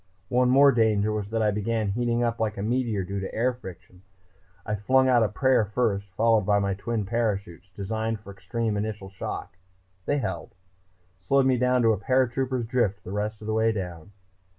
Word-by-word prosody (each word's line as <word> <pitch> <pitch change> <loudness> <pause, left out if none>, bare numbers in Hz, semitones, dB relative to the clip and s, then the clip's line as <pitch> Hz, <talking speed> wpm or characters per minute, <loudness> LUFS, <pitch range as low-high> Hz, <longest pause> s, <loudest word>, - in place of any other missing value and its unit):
One 125 0 +3
more 140 +2 +7
danger 110 -3 +2
was 105 -2 -3
that 110 0 0
I 105 - +3
began 105 +1 -1
heating 120 +3 0
up 115 -1 -1
like 110 -2 -1
a 100 - -3
meteor 115 -3 0
due 100 +2 -4
to 95 - -5
air 125 +3 +1
friction. 90 -6 -12 0.6
I 105 - -2
flung 130 +6 +3
out 125 -2 +4
a 110 - +2
prayer 130 +2 +2
first, 105 -2 -1
followed 115 -1 +3
by 100 +1 +2
my 100 -1 0
twin 105 +2 -3
parachutes, 100 -5 -2
designed 110 +2 -3
for 100 -1 -11
extreme 110 +1 -3
initial 105 -2 -4
shock. 90 -1 -6 0.5
They 145 - +2
held. 95 - -4 0.6
Slowed 135 +9 +2
me 130 -2 +2
to 125 -2 +3
a - - -1
paratrooper's 130 +1 0
drift 110 -5 0
the - - -8
rest 105 +1 -3
of - - -9
the 110 - -1
way 110 +1 +3
down." 90 -5 -6
110 Hz, 190 wpm, -26 LUFS, 100-120 Hz, 0.6 s, more